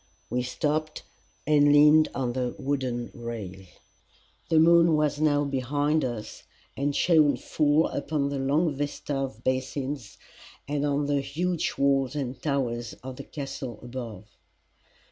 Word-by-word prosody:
We 125 Hz, -, +1 dB
stopped, 155 Hz, +5 st, -2 dB, 0.4 s
and 145 Hz, -1 st, +5 dB
leaned 150 Hz, +1 st, +6 dB
on 125 Hz, -3 st, -1 dB
the 125 Hz, -1 st, -2 dB
wooden 130 Hz, -4 st, -2 dB
rail. 105 Hz, -6 st, -7 dB, 0.8 s
The 165 Hz, -, +3 dB
moon 165 Hz, 0 st, +6 dB
was 150 Hz, -1 st, 0 dB
now 145 Hz, -2 st, +3 dB
behind 145 Hz, +3 st, 0 dB
us, 120 Hz, -4 st, -5 dB, 0.3 s
and 140 Hz, +1 st, -1 dB
shone 155 Hz, -6 st, +4 dB
full 150 Hz, +3 st, +2 dB
upon 140 Hz, 0 st, -2 dB
the 140 Hz, -1 st, -3 dB
long 145 Hz, +4 st, +1 dB
vista 145 Hz, +1 st, -4 dB
of 130 Hz, -4 st, -4 dB
basins 130 Hz, -1 st, -3 dB, 0.5 s
and 145 Hz, 0 st, -1 dB
on 145 Hz, 0 st, 0 dB
the 140 Hz, -1 st, +1 dB
huge 165 Hz, +5 st, -2 dB
walls 135 Hz, -1 st, +2 dB
and 130 Hz, -3 st, -4 dB
towers 125 Hz, -5 st, -2 dB
of 130 Hz, -1 st, -7 dB
the -, -, -7 dB
Castle 135 Hz, -5 st, -6 dB
above. 120 Hz, -5 st, -7 dB
140 Hz, 135 wpm, -27 LUFS, 125-150 Hz, 0.8 s, leaned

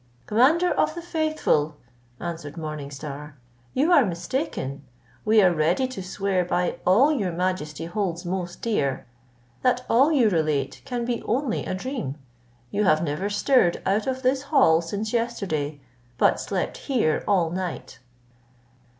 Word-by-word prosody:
"Commander 300 Hz, -, +4 dB
of 310 Hz, +1 st, +1 dB
the 340 Hz, -, -5 dB
faithful," 310 Hz, -, 0 dB, 0.4 s
answered 165 Hz, -2 st, -6 dB
Morning 155 Hz, -3 st, -5 dB
Star, 145 Hz, +1 st, -8 dB, 0.4 s
"you 295 Hz, +7 st, +3 dB
are 290 Hz, -6 st, +7 dB
mistaken, 170 Hz, -, -3 dB, 0.4 s
we 215 Hz, -1 st, +5 dB
are 180 Hz, -2 st, +5 dB
ready 170 Hz, +11 st, +1 dB
to 255 Hz, -6 st, -7 dB
swear 190 Hz, 0 st, -1 dB
by 175 Hz, 0 st, -1 dB
all 240 Hz, +12 st, +6 dB
your 200 Hz, -10 st, -1 dB
majesty 165 Hz, -3 st, -2 dB
holds 175 Hz, -1 st, -3 dB
most 175 Hz, -1 st, -4 dB
dear, 140 Hz, -, 0 dB, 0.6 s
that 250 Hz, 0 st, +1 dB
all 270 Hz, +7 st, +4 dB
you 265 Hz, -7 st, +4 dB
relate 155 Hz, -7 st, 0 dB
can 240 Hz, -2 st, -3 dB
be 240 Hz, -1 st, -2 dB
only 250 Hz, 0 st, -1 dB
a -, -, -2 dB
dream. 210 Hz, -, -4 dB, 0.6 s
You 210 Hz, -, +1 dB
have 155 Hz, -2 st, +4 dB
never 165 Hz, +6 st, -2 dB
stirred 205 Hz, -3 st, +3 dB
out 205 Hz, +4 st, +1 dB
of 260 Hz, 0 st, -2 dB
this 260 Hz, +1 st, +2 dB
hall 215 Hz, -, +5 dB
since 205 Hz, +6 st, -4 dB
yesterday, 185 Hz, -12 st, -2 dB, 0.4 s
but -, -, +3 dB
slept -, -, -2 dB
here 255 Hz, -, 0 dB
all 180 Hz, -5 st, +2 dB
night." 180 Hz, -1 st, -5 dB
190 Hz, 145 wpm, -25 LUFS, 160-250 Hz, 0.6 s, are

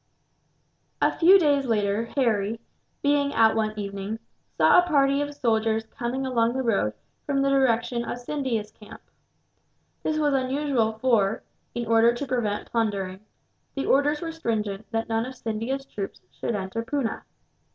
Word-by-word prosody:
A -, -, +3 dB
few 365 Hz, +4 st, +6 dB
days 285 Hz, -6 st, +2 dB
later, 210 Hz, -1 st, +1 dB
Harry, 225 Hz, -4 st, +1 dB, 0.4 s
being 285 Hz, 0 st, +2 dB
out 225 Hz, -1 st, +5 dB
one 215 Hz, -1 st, -1 dB
evening, 200 Hz, +1 st, -4 dB, 0.4 s
saw -, -, +6 dB
a 355 Hz, -, +1 dB
party 280 Hz, -3 st, +3 dB
of 290 Hz, 0 st, -4 dB
soldiers 225 Hz, -4 st, +1 dB
coming 260 Hz, +1 st, -2 dB
along 235 Hz, -2 st, +1 dB
the 265 Hz, 0 st, -1 dB
road 200 Hz, -, +1 dB, 0.3 s
from 275 Hz, -1 st, +1 dB
the 275 Hz, -, +2 dB
direction 245 Hz, -3 st, +2 dB
of 240 Hz, -, -4 dB
Scindia's 245 Hz, -5 st, -3 dB
camp. 210 Hz, -, -13 dB, 1.0 s
This 310 Hz, -, -1 dB
was 295 Hz, -2 st, +2 dB
unusual 260 Hz, -3 st, +1 dB
for, 220 Hz, -3 st, +1 dB, 0.3 s
in 240 Hz, 0 st, -2 dB
order 230 Hz, +1 st, +4 dB
to 285 Hz, -, -4 dB
prevent 235 Hz, -6 st, -2 dB
plundering, 200 Hz, -5 st, -1 dB, 0.6 s
the 275 Hz, -, -2 dB
orders 290 Hz, +2 st, +2 dB
were 330 Hz, -1 st, -3 dB
stringent 215 Hz, -9 st, -3 dB
that 225 Hz, 0 st, -2 dB
none 225 Hz, +1 st, -1 dB
of 260 Hz, -, -8 dB
Scindia's 235 Hz, +4 st, -3 dB
troops 200 Hz, -7 st, -6 dB
should 235 Hz, -, -3 dB
enter 195 Hz, +3 st, -3 dB
Poona. 250 Hz, -2 st, -2 dB
235 Hz, 150 wpm, -25 LUFS, 220-275 Hz, 1.0 s, few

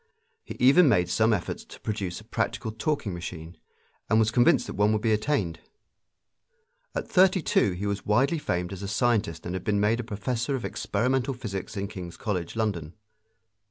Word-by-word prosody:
He -, -, -8 dB
even 140 Hz, +6 st, +6 dB
made 90 Hz, -7 st, +3 dB
some 110 Hz, +1 st, +3 dB
efforts 100 Hz, -5 st, -2 dB
to -, -, -13 dB
produce 100 Hz, -5 st, -3 dB
a -, -, -14 dB
practical 110 Hz, -, -2 dB
talking 110 Hz, -2 st, -2 dB
machine, 85 Hz, -1 st, -7 dB, 0.5 s
and 110 Hz, -, +4 dB
was 110 Hz, -1 st, +3 dB
convinced 125 Hz, +4 st, +4 dB
that -, -, -6 dB
one 105 Hz, +1 st, +2 dB
would 105 Hz, -, 0 dB
be 110 Hz, -2 st, +3 dB
attained. 105 Hz, -, 0 dB, 1.4 s
At -, -, -2 dB
thirty 185 Hz, -1 st, +4 dB
two 100 Hz, -, +2 dB
he 95 Hz, +3 st, -4 dB
was 100 Hz, -1 st, -2 dB
widely 135 Hz, +10 st, +2 dB
famed 90 Hz, -8 st, -2 dB
as 95 Hz, -, -7 dB
a 100 Hz, -, -4 dB
scientist 110 Hz, -, 0 dB
and 90 Hz, -, -3 dB
had 95 Hz, -1 st, -4 dB
been 105 Hz, -1 st, +1 dB
made 110 Hz, +3 st, +2 dB
a -, -, -2 dB
professor 120 Hz, +4 st, -2 dB
of 125 Hz, -, -4 dB
experimental 130 Hz, +2 st, -1 dB
physics 105 Hz, -4 st, -5 dB
in 100 Hz, 0 st, -2 dB
King's 90 Hz, -4 st, -8 dB
College, 90 Hz, -5 st, -3 dB
London. 95 Hz, -8 st, -2 dB
105 Hz, 185 wpm, -27 LUFS, 95-120 Hz, 1.4 s, even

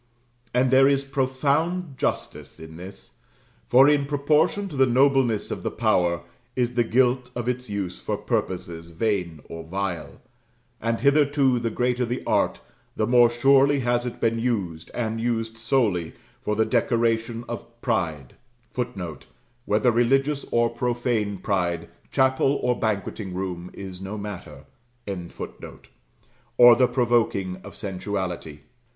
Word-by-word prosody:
And 125 Hz, +1 st, +2 dB
there 135 Hz, +1 st, +6 dB
is 140 Hz, 0 st, +2 dB
profound 140 Hz, +5 st, 0 dB
justice -, -, -3 dB
in 80 Hz, 0 st, -10 dB
this; 95 Hz, +6 st, -11 dB, 0.5 s
for 130 Hz, +3 st, +7 dB
in 145 Hz, -1 st, +3 dB
proportion 150 Hz, +7 st, +2 dB
to 150 Hz, -, -8 dB
the 135 Hz, -1 st, +4 dB
nobleness 130 Hz, -3 st, +2 dB
of -, -, -4 dB
the -, -, -2 dB
power 85 Hz, -1 st, +1 dB, 0.3 s
is 125 Hz, -1 st, 0 dB
the 120 Hz, -1 st, +2 dB
guilt 125 Hz, +2 st, +2 dB
of 120 Hz, -1 st, -3 dB
its 125 Hz, -1 st, -2 dB
use 100 Hz, -3 st, -4 dB
for -, -, -3 dB
purposes 85 Hz, -3 st, -3 dB
vain 85 Hz, -3 st, -2 dB
or 85 Hz, 0 st, -7 dB
vile; 85 Hz, -3 st, -4 dB, 0.6 s
and 115 Hz, +1 st, -1 dB
hitherto 140 Hz, -2 st, +3 dB
the 115 Hz, -1 st, -1 dB
greater 125 Hz, +2 st, 0 dB
the 120 Hz, +1 st, -3 dB
art, -, -, +1 dB, 0.4 s
the 110 Hz, -, +1 dB
more 120 Hz, 0 st, +5 dB
surely 135 Hz, +3 st, +4 dB
has 120 Hz, 0 st, +1 dB
it 120 Hz, -, -6 dB
been 115 Hz, 0 st, +1 dB
used, 100 Hz, -9 st, -2 dB
and 115 Hz, -1 st, -2 dB
used 115 Hz, -1 st, -2 dB
solely, 110 Hz, -9 st, +1 dB, 0.3 s
for 105 Hz, -, -1 dB
the 110 Hz, +1 st, +2 dB
decoration 115 Hz, -1 st, 0 dB
of 120 Hz, -3 st, -6 dB, 0.2 s
pride, 80 Hz, -, -1 dB, 0.4 s
[Footnote: 95 Hz, -, -5 dB, 0.4 s
Whether 105 Hz, +4 st, +3 dB
religious 135 Hz, +5 st, +2 dB
or 120 Hz, 0 st, +2 dB
profane 120 Hz, -4 st, -1 dB
pride, 90 Hz, -3 st, -1 dB, 0.2 s
chapel 130 Hz, +1 st, +3 dB
or 125 Hz, 0 st, +2 dB
banqueting 100 Hz, -3 st, -3 dB
room, 90 Hz, -2 st, -4 dB
is 95 Hz, -2 st, -8 dB
no 95 Hz, +3 st, -5 dB
matter.] 100 Hz, -3 st, -8 dB, 1.9 s
or 120 Hz, -1 st, +9 dB
the 125 Hz, +1 st, +4 dB
provoking 115 Hz, -7 st, +1 dB
of -, -, -11 dB
sensuality. 95 Hz, -6 st, -4 dB
115 Hz, 135 wpm, -24 LUFS, 95-130 Hz, 1.9 s, or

